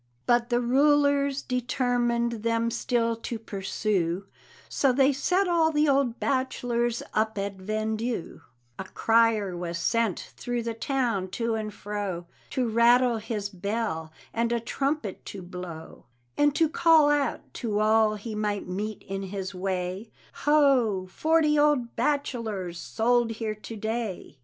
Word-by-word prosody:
But 240 0 +2
the 240 0 +2
rulers 280 +2 +3
determined 240 -2 0
them 230 +1 0
still 230 -1 0
to 230 +1 -5
pursue, 195 -3 -2 0.4
So 275 - +2
they 270 +2 +4
set 360 +8 +1
all 330 -2 +3
the 300 0 +2
old 270 -4 +2
bachelors 240 -3 -1
up 220 0 0
at 200 0 -2
vendue: 215 +2 -3 0.4
A 190 - -4
crier 225 -3 +2
was 175 -1 -4
sent 220 +3 +1 0.2
through 245 -1 -3
the 230 0 -2
town 230 -5 -1
to 230 -1 0
and 215 -1 -3
fro, 200 -4 -4 0.2
To 255 -2 0
rattle 235 +1 +4
his 215 -2 -4
bell 195 -4 -3 0.2
and 230 +1 0
a 235 - +1
trumpet 270 -2 -2
to 195 -2 -7
blow, 175 -3 -9 0.3
And 290 0 +3
to 325 0 +4
call 315 -1 +5
out 290 -1 -1
to 215 -4 0
all 215 0 +3
he 215 +2 -6
might 210 -2 -2
meet 205 +4 -4
in 195 0 -5
his 195 0 -5
way, 185 +2 -3 0.4
"Ho! 265 -10 +4
forty 310 +1 +3
old 290 -5 +2
bachelors 230 -10 -2
sold 230 +3 +1
here 220 -1 -3
to 215 +2 -9
day!" 220 - -4
230 Hz, 140 wpm, -27 LUFS, 205-255 Hz, 0.4 s, call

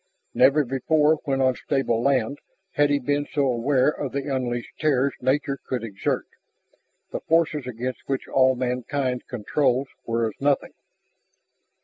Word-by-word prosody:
Never 145 +2 +4
before 150 +4 +2
when 135 -2 0
on 130 -1 +4
stable 135 -5 0
land 135 0 +1 0.3
had 145 -4 +3
he 145 - +3
been 145 +2 -1
so 145 -2 +1
aware 130 +1 +2
of 145 -3 -4
the 140 0 -2
unleashed 120 -2 -4
terrors 140 -2 +2
nature 135 +1 0
could 125 -3 -3
exert, 100 -4 -2 0.9
the - - -3
forces 160 -4 +1
against 125 +2 -5
which 135 -1 -2
all 130 -1 +4
mankind's 125 +1 -2
controls 130 +3 0 0.2
were 115 0 +1
as 110 - -5
nothing. 140 0 +1
135 Hz, 140 wpm, -24 LUFS, 125-145 Hz, 0.9 s, Never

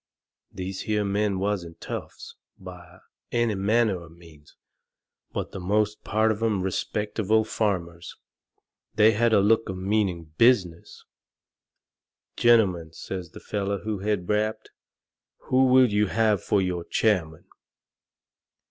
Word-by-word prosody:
These 95 0 -6
here 105 -1 +1
men 100 0 0
wasn't 95 -4 -3
toughs, - - -8 0.2
by 90 -1 -12 0.3
any 120 -2 +1
manner 100 -1 +1
of 80 -1 -15
means, 80 -4 -18 0.8
but - - -4
the 95 - -7
most 105 +3 0
part 110 +1 +1
of 110 0 -4
'em 105 -5 0
respectable 105 +3 0
farmers. 90 -6 -3 0.8
They 110 +1 +6
had 115 +2 +1
a 105 - +5
look 110 +2 +2
of 95 - -4
meaning 95 -5 -1
business. 95 -9 +2 1.3
"Gentlemen," 95 -9 +3
says 90 0 -7
the - - -12
feller 100 -1 -3
who 105 -2 -3
had 100 -3 -2
rapped, 110 +1 -1 0.8
"who 130 +1 +4
will 130 -3 +5
you 105 0 +2
have 110 -2 +1
for 100 -2 +1
your 90 -2 -2
chairman?" 85 -7 0
100 Hz, 125 wpm, -25 LUFS, 90-110 Hz, 1.3 s, They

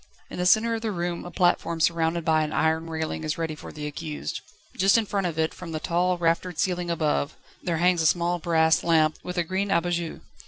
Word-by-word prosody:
In - - -6
the 180 - +2
centre 230 +4 +4
of 225 - -2
the 225 - -2
room 175 -2 -3
a - - -6
platform 175 -2 +1
surrounded 165 0 +1
by 160 -1 +3
an 155 - -3
iron 160 +1 +1
railing 160 0 -3
is 155 0 -2
ready 165 -1 -2
for 155 - -10
the 150 -1 -7
accused. 150 - -5 0.3
Just 195 +4 +4
in 225 - +1
front 195 -2 -1
of 165 -2 -5
it, 160 0 0
from 170 -3 -8
the 155 - -2
tall, 180 +3 +1
raftered 170 0 0
ceiling 180 -1 -1
above, 155 -2 0 0.2
there 170 -2 -1
hangs 175 0 +3
a 160 - +4
small 175 +1 +1
brass 160 -1 +3
lamp, 155 -2 +3
with 180 0 -6
a 175 - +2
green 190 +4 -1
_abat 175 -2 +1
jour. 170 -1 -3
170 Hz, 230 wpm, -25 LUFS, 160-180 Hz, 0.3 s, centre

